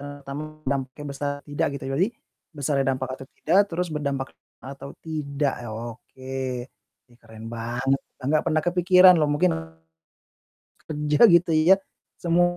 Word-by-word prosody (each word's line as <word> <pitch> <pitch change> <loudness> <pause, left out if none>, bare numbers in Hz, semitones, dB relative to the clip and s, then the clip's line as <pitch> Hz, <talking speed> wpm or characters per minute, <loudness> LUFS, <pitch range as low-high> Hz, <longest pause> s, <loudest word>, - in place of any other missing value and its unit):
E 145 - -8 0.2
tamu 140 +2 -5 0.3
dampaknya 135 +1 -3
besar, 145 +1 -2
tidak 145 - 0
gitu - - -10
ya 135 - -3
jadi, 185 +5 +3 0.5
besarnya 140 -1 0
dampak 130 0 -2
atau 135 - -11
tidak, 180 +6 +4
terus 180 +1 -2
berdampak 140 -3 -2 0.4
atau 140 +1 -8
tidak 145 -3 -1
ya, 120 - -6
oke. 120 +3 -9 0.8
Ih 120 - -22
keren 110 0 -12
banget, 120 +4 -1 0.2
enggak 150 +3 +2
pernah 155 0 +2
kepikiran 180 +1 +7
loh 150 -1 +2
mungkin 175 +5 +3 1.4
kerja 150 -1 -1 0.2
gitu 170 0 +3 0.2
ya, 190 - +10 0.5
semu 170 0 +3
145 Hz, 145 wpm, -25 LUFS, 135-160 Hz, 1.4 s, ya